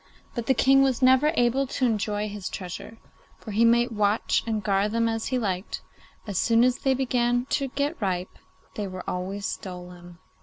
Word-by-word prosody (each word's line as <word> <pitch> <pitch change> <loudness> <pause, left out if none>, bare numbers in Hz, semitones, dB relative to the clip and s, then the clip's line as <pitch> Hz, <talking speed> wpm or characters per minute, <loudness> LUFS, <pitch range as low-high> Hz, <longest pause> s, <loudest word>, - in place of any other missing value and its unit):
But 235 -1 -4
the 265 - +4
King 270 +1 +5
was 265 -2 +1
never 260 +4 +5
able 250 +2 +2
to 255 - -1
enjoy 210 -2 0
his 205 -2 -6
treasure, 185 +4 -7 0.4
for 215 - -9
he 215 +3 +2
might 235 +1 +4
watch 210 0 +1
and 215 -2 -1
guard 200 +1 +1
them 230 0 +2
as 225 -1 -2
he 255 - 0
liked, 195 -5 -3 0.4
as 200 -4 -2
soon 230 0 +4
as 250 0 +2
they 265 -1 +2
began 245 -1 +1
to 275 - +1
get 285 +3 -2
ripe 185 -2 -2 0.3
they 205 -2 -4
were 185 -1 -8
always 195 +2 -3
stolen. 180 -1 -7
225 Hz, 185 wpm, -26 LUFS, 200-250 Hz, 0.4 s, King